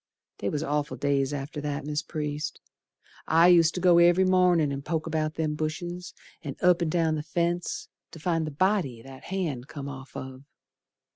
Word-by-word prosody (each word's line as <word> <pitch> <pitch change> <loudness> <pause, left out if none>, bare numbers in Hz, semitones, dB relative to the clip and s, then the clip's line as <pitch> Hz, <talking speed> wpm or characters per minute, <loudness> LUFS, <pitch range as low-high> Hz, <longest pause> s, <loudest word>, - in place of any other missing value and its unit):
They 100 - -1
was 150 +1 -2
awful 150 0 -1
days 140 -1 +1
after 145 +1 -5
that, 145 0 -3
Mis' 150 +1 -1
Priest, 150 -2 -4 0.7
I 165 +2 +6
used 170 -2 +5
ter 180 - -2
go 175 -1 +6
every 175 +2 +5
mornin' 180 -5 +4
and 140 0 -4
poke 160 +1 -2
about 155 -1 -1
them 155 -2 -1
bushes, 175 +4 -4 0.3
An' 140 -4 -6
up 180 -1 +4
and 170 - +1
down 165 -1 +1
the 155 - -1
fence, 170 +2 -2 0.2
Ter 165 - -12
find 165 -1 0
the - - -4
body 150 - 0
that 135 0 -12
hand 160 -10 -3
come 140 -3 -7
off 135 -1 -8
of. 130 0 -7
155 Hz, 185 wpm, -27 LUFS, 145-175 Hz, 0.7 s, I